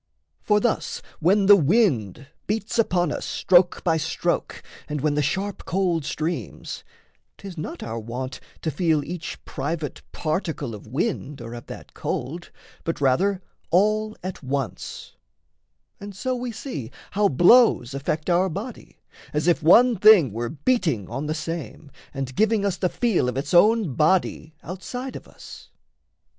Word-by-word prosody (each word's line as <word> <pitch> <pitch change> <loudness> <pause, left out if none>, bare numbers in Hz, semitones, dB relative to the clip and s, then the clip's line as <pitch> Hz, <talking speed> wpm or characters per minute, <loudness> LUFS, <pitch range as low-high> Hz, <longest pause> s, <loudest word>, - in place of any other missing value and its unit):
For 210 -1 +3
thus 240 +1 -1 0.2
When 195 +5 +3
the 205 +1 +9
wind 150 - +2 0.2
beats 220 +2 -2
upon 175 -7 +2
us - - -4
stroke 175 -1 +3
by 165 -3 +2
stroke 155 - -2 0.3
And 150 0 -2
when 150 0 +1
the 150 - +1
sharp 190 +7 -2
cold 175 -4 0
streams, 155 - -4 0.5
'tis 195 -3 -9
not 155 - -6
our 115 0 -4
wont 125 +4 -5 0.2
To 160 - 0
feel 155 0 +1
each 170 0 -6
private 155 -1 -4
particle 155 - -2
of 105 +1 -10
wind 145 - -2
Or 115 0 -8
of 120 - -9
that - - -10
cold, 165 +8 -4 0.3
but 165 - -3
rather 180 +8 +2 0.3
all 215 +4 +2
at 185 0 -5
once; 135 -2 -5 0.8
And 200 -1 -9
so 255 +6 -2
we 245 0 -4
see 205 - -6 0.2
how 205 +1 +3
blows 175 - +5
affect 150 +3 -2
our 180 +2 +3
body, 205 +9 -7 0.4
As 150 +2 0
if 170 -2 +3
one 230 +10 +6
thing 185 - +7
were 115 +1 -3
beating 150 - 0
on 135 +5 -3
the 155 - -1
same 160 -3 -6 0.2
And 135 -2 -4
giving 220 -1 +2
us 200 - 0
the 180 - 0
feel 210 - +1
of 125 - -4
its 140 - -3
own 210 - +5
body 160 0 +1
Outside 245 +9 -6
of - - -9
us. - - -13
170 Hz, 150 wpm, -24 LUFS, 140-200 Hz, 0.8 s, the